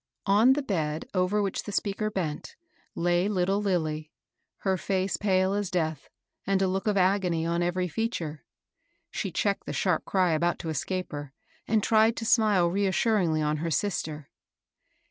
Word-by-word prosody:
On 215 +6 +5
the 290 +1 -2
bed 160 - -2
over 190 +3 +1
which 195 - -2
the 205 - -7
speaker 205 +1 -1
bent 170 -8 -4 0.4
lay 175 +2 +1
little 195 0 +1
Lilly, 155 -6 -1 0.5
her 190 -1 +1
face 190 +1 -1
pale 190 -1 +1
as 205 -2 -1
death, 160 -5 -2 0.4
and 195 -1 +2
a 190 - +2
look 190 +4 -2
of 210 -1 +2
agony 180 -3 +2
on 170 +1 0
every 180 +1 0
feature. 165 - -3 0.7
She 195 - -3
checked 200 +4 -1
the - - -3
sharp 180 -5 +1
cfy 185 -3 +2
about 170 +2 +1
to 165 - -5
escape 185 +5 -3
her, 145 -2 -7 0.3
and 220 -2 +2
tried 220 +1 +4
to 225 - -4
smile 210 -6 +4
reas 195 +2 0
suringly 175 -9 +2
on 150 0 0
her 165 +2 -2
sister. 155 -2 -2
185 Hz, 165 wpm, -27 LUFS, 165-205 Hz, 0.7 s, On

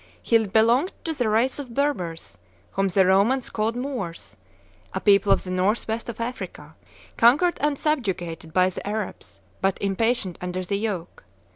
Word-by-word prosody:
He 230 - +2
belonged 230 - +3
to 325 - -2
the 245 -7 0
race 235 +6 +1
of 250 -5 -7
Berbers, 185 - -2 0.4
whom 195 0 +1
the 190 0 +3
Romans 205 +8 +3
called 220 +2 -1
Moors, 245 -10 -5 0.6
a - - 0
people 200 -1 +4
of - - +3
the 185 - -6
north 190 +5 +1
west 225 +2 -3
of 235 - -6
Africa, 245 +2 -6 0.4
conquered 290 +10 +4
and 295 -1 +1
subjugated 180 - -2
by 185 +2 +3
the 185 - -7
Arabs, 210 -1 -5 0.2
but 195 0 +1
impatient 200 -1 0
under 180 +1 -3
the 200 +2 -2
yoke. 200 -6 -4
215 Hz, 160 wpm, -24 LUFS, 185-245 Hz, 0.6 s, people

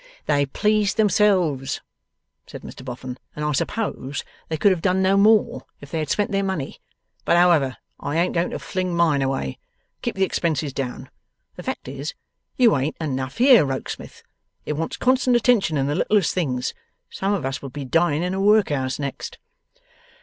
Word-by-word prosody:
'They 145 -1 +2
pleased 210 +7 +1
themselves,' 190 -10 +2 0.7
said - - -10
Mr - - -10
Boffin, 125 0 -7 0.2
'and 150 - -3
I 150 - +1
suppose 145 - -2 0.3
they 160 - -1
could 200 +6 +4
have 180 -3 0
done 185 0 +2
no 190 +1 +4
more 210 +1 +4 0.2
if 140 0 -13
they 165 - -1
had 155 -2 -3
spent 205 - 0
their 195 0 +1
money. 190 -8 -3 0.4
But 170 - +3
however, 165 -7 +4 0.2
I 145 +3 -2
ain't 175 +2 +1
going 170 0 +1
to - - -4
fling 185 -2 -3
mine 160 -5 +3
away. 135 - -2 0.4
Keep - - -3
the 195 - +1
expenses 155 -6 -1
down. 130 -3 -5 0.4
The - - -8
fact - - -5
is, 140 +4 -5 0.4
you 240 -4 +5
ain't 140 +3 -1
enough 135 -3 -3
here, 250 - +7
Rokesmith. 135 -2 -5 0.4
It - - -2
wants 160 +2 -3
constant 255 0 +3
attention 225 - +3
in 135 - +1
the 145 - 0
littlest 205 +3 +2
things. 130 -9 -1 0.4
Some 195 +1 -1
of 185 - -3
us 135 +1 -3
will 135 - -6
be 140 +1 -6
dying 165 +2 +2
in 180 +1 -1
a 190 - -1
workhouse 155 -11 +2
next. 140 -2 -5
160 Hz, 180 wpm, -23 LUFS, 135-195 Hz, 0.7 s, here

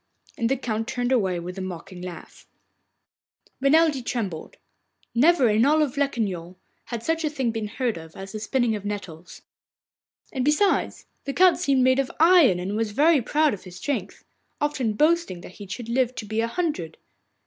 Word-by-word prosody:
And 230 -1 0
the 270 - +1
Count 225 -3 -3
turned 245 +1 -2
away 190 -8 +1
with 180 +3 -7
a - - -4
mocking 180 0 -7
laugh. 180 -1 -10 1.1
Renelde 290 -1 +3
trembled. 200 -10 -4 0.6
Never 275 +2 +4
in 215 +1 +3
all 295 +4 +4
Locquignol 235 - -1 0.3
had 235 -2 -5
such 325 +3 0
a 305 - +1
thing 265 -5 -1
been 220 -1 -3
heard 240 0 -2
of 160 0 -13
as 195 0 -8
the 215 - -5
spinning 235 +1 0
of 205 - -6
nettles. 190 -5 -7 0.9
And 260 -3 -1
besides, 300 +8 +1 0.2
the 275 - -3
Count 365 +2 +5
seemed 270 -2 +2
made 260 +1 +4
of 270 - 0
iron 325 - +6
and 190 +3 -3
was 220 -1 -1
very 305 +3 +4
proud 300 +3 +2
of 200 - -7
his 180 -1 -11
strength, 205 -1 -4 0.3
often 270 -7 0
boasting 305 - +1
that 180 - -12
he 205 - -8
should 210 +5 -6
live 250 +1 0
to 220 - -5
be 220 +2 -1
a 230 - 0
hundred. 230 - -3
235 Hz, 180 wpm, -24 LUFS, 195-280 Hz, 1.1 s, iron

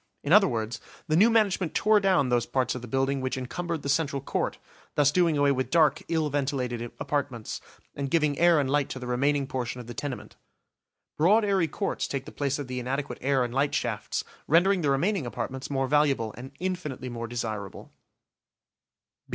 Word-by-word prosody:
In 145 - +1
other 205 -1 +7
words, 115 -2 -3 0.3
the 155 - +2
new 205 +8 +6
management 200 -7 +2
tore 215 0 +4
down 185 -9 +2
those 120 -1 +1
parts 130 -2 0
of 125 - -6
the 120 - -8
building 135 +2 0
which 130 0 -2
encumbered 165 +5 -4
the - - -4
central 140 -1 +1
court, 135 - -2 0.4
thus 145 -1 +4
doing 170 -2 +3
away 145 0 +4
with 130 -1 -1
dark, 160 -2 +3
ill 160 -2 +1
ventilated 130 -4 -1 0.2
apartments, 140 -5 -3 0.3
and 140 -1 -3
giving 150 -2 +1
air 170 -2 +5
and 140 - +1
light 145 0 +1
to - - -5
the 125 - -7
remaining 140 +3 +1
portion 125 -3 -4
of 120 - -8
the 120 - -7
tenement. 130 +2 -6 0.8
Broad 210 +8 +5
airy 195 -4 +2
courts - - -2
take 140 -1 -4
the - - -9
place 140 -1 -1
of 145 -3 -5
the 125 0 -4
inadequate 135 +3 -3
air 135 -1 +2
and 120 -1 -4
light 140 +2 +1
shafts, - - -2 0.2
rendering 180 +4 +4
the 145 - +1
remaining 160 +2 +1
apartments 130 +2 -5
more 135 -2 0
valuable 140 -6 +2
and 125 +2 -8
infinitely 175 -8 -4
more 115 -1 -5
desirable. 110 -4 -5
140 Hz, 190 wpm, -27 LUFS, 130-160 Hz, 0.8 s, other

